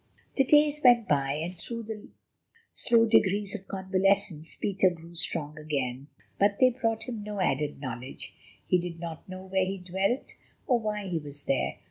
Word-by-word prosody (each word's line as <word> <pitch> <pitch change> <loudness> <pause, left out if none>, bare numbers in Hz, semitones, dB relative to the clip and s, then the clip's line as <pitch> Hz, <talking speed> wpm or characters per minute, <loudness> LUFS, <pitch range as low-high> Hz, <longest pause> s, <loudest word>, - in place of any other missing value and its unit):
The 270 - +4
days 295 +1 +4
went 240 -3 +6
by, 140 -1 +2
and 165 +5 -4
through 230 +7 -6
the 215 -1 -7 0.7
slow 230 -1 +4
degrees 205 -2 +3
of 195 -3 -7
convalescence 190 -3 +1
Peter 190 -1 +2
grew 170 -1 -11
strong 155 -2 -2
again. 140 -3 -3 0.3
But 200 0 +3
they 255 -1 +6
brought 225 -3 -1
him 235 -4 -5
no 210 -1 -5
added 150 -5 0
knowledge. 130 -1 -7 0.3
He 180 - +3
did 170 -1 -5
not 165 +1 -7
know 185 0 -7
where 190 0 +1
he 195 +1 -3
dwelt 190 +7 -1 0.3
or 245 -3 +3
why 210 -2 -3
he 175 -3 -1
was 145 -1 -9
there. 135 - 0
190 Hz, 170 wpm, -28 LUFS, 160-215 Hz, 0.7 s, went